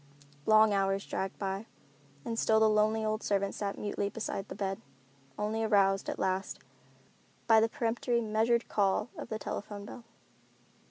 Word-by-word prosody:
Long 215 -1 +6
hours 195 0 +1
dragged 190 0 -3
by, 195 +2 -3 0.6
and 230 0 -2
still 220 0 +4
the 220 - +5
lonely 215 +1 +2
old 215 +1 -1
servant 200 -1 0
sat 200 -1 -3
mutely 205 -1 -2
beside 205 -2 -4
the - - -7
bed, 195 +1 -3 0.6
only 215 +2 -1
aroused, 195 -3 +3
at - - -3
last, 190 +1 -1 0.9
by 225 -1 +6
the 225 +1 +2
peremptory, 235 +1 0
measured 225 +1 +1
call 200 +3 +1
of - - -7
the 220 - -2
telephone 205 -1 -6
bell. 235 +3 -10
215 Hz, 155 wpm, -31 LUFS, 195-220 Hz, 0.9 s, Long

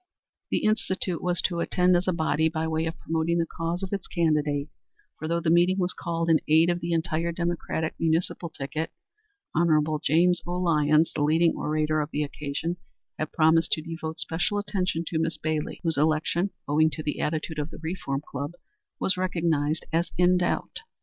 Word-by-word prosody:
The - - 0
Institute 190 -5 0
was 180 0 0
to 170 -2 0
attend 180 +1 +3
as 175 +2 +1
a - - +4
body 160 -2 +1
by 160 0 -2
way 160 0 0
of 165 0 -4
promoting 165 +1 0
the 170 - +2
cause 165 +3 -3
of 190 - -4
its 200 - -3
candidate, 150 -4 +1 0.5
for 155 - -4
though 170 +1 +1
the 165 -1 +1
meeting 175 +3 +4
was 180 -1 0
called 165 -1 -2
in 165 -1 +5
aid 160 +3 +5
of 175 - -1
the 170 0 -3
entire 165 0 0
Democratic 170 -2 -2
municipal 165 +1 0
ticket, 155 +2 -4 0.6
Hon. 155 -2 +2
James 175 +4 +3
O. 175 - -2
Lyons, 155 -2 +3
the 150 - -2
leading 160 +3 +4
orator 155 0 0
of 150 - -3
the 150 -1 -1
occasion, 150 +4 -3 0.4
had 155 - -2
promised 160 +1 +3
to 155 - -1
devote 160 -1 -5
special 175 +6 0
attention 185 -5 -1
to 160 0 -1
Miss 160 -1 -1
Bailey, 155 0 -2
whose 165 -4 +1
election, 160 +5 +1 0.2
owing 155 +2 +4
to 155 0 -6
the 150 - -2
attitude 155 0 -2
of 150 +1 -2
the - - -10
Reform 160 -4 -3
Club, 140 +4 -4 0.5
was 190 - +1
recognized 165 -4 0
as 170 +2 +1
in 180 +1 +5
doubt. 175 - -1
165 Hz, 185 wpm, -26 LUFS, 155-175 Hz, 0.6 s, in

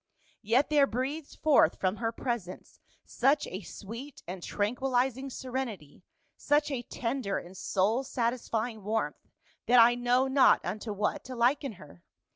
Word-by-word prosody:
Yet 240 +8 +2
there 290 -2 +5
breathed 275 +6 -4
forth 305 -2 +4
from 190 +2 0
her 225 -1 -1
presence 230 -7 -5 0.3
such 275 +4 +2
a 185 - -6
sweet 230 +9 -9
and 180 +1 -6
tranquilizing 250 +6 -1
serenity, 245 - -5 0.3
such 295 +1 +1
a 260 -3 -2
tender 235 -3 -3
and 180 +2 -9
soul 210 +7 0
satisfying 235 -3 -2
warmth, 220 +2 -3 0.4
that 245 +1 +6
I 235 +1 +7
know 245 +2 +2
not 265 0 +4
unto 210 +5 -4
what 205 0 -1
to 255 - -7
liken 250 +2 +1
her. 150 - -15
240 Hz, 140 wpm, -29 LUFS, 210-265 Hz, 0.4 s, I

